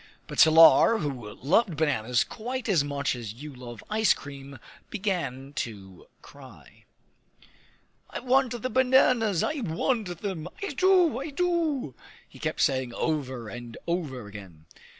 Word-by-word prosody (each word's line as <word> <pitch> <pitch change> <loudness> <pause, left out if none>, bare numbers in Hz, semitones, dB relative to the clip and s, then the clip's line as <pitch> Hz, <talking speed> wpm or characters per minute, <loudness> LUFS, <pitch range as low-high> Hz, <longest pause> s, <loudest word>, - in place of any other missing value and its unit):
But - - -7
Salar, 165 +8 +7
who 130 - -5
loved 170 - +1
bananas 125 -6 +1
quite 245 +2 -6
as 180 -9 +3
much 140 -1 -2
as 115 -3 -7
you 145 +4 -9
love 120 -3 -10
ice 215 0 +3
cream, 140 -1 -10 0.3
began 170 - -3
to 95 -5 -6 0.2
cry. - - -16 1.2
"I - - -5
want 255 -1 +1
the 255 - -1
bananas; 250 -7 +3
I 300 - -1
want 185 0 -2
them; 180 -5 -4 0.2
I 400 - -2
do, 355 -3 +3
I 280 +3 -5
do!" 315 - -1 0.3
he - - -16
kept - - -2
saying 130 -3 0
over 130 -7 -2
and 120 +1 -9
over 150 - -3
again. 95 -7 -12
160 Hz, 135 wpm, -27 LUFS, -, 1.2 s, Salar